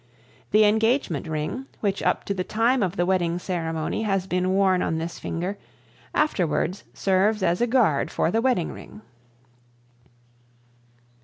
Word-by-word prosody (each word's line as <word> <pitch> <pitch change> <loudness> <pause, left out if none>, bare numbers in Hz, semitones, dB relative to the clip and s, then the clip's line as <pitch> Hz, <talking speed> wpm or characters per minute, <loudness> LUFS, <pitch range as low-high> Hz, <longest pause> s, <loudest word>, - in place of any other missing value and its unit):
The 215 +1 +5
engagement 220 - +1
ring, 160 - -3
which 200 -2 -1
up - - +1
to 200 - -2
the 185 -2 -2
time 235 +6 +1
of 185 -2 0
the 175 - +1
wedding 175 -2 +1
ceremony 165 -1 -3
has 195 -4 0
been 185 0 0
worn 190 -1 +3
on 160 - -1
this 165 +1 -5
finger, 180 +5 -4 0.6
afterwards 185 - 0
serves 195 +2 +1
as 175 +3 +1
a 240 - +3
guard 225 - +2
for 165 - 0
the 225 - +1
wedding 245 -9 +1
ring. 105 +1 -12
190 Hz, 145 wpm, -24 LUFS, 170-215 Hz, 0.6 s, The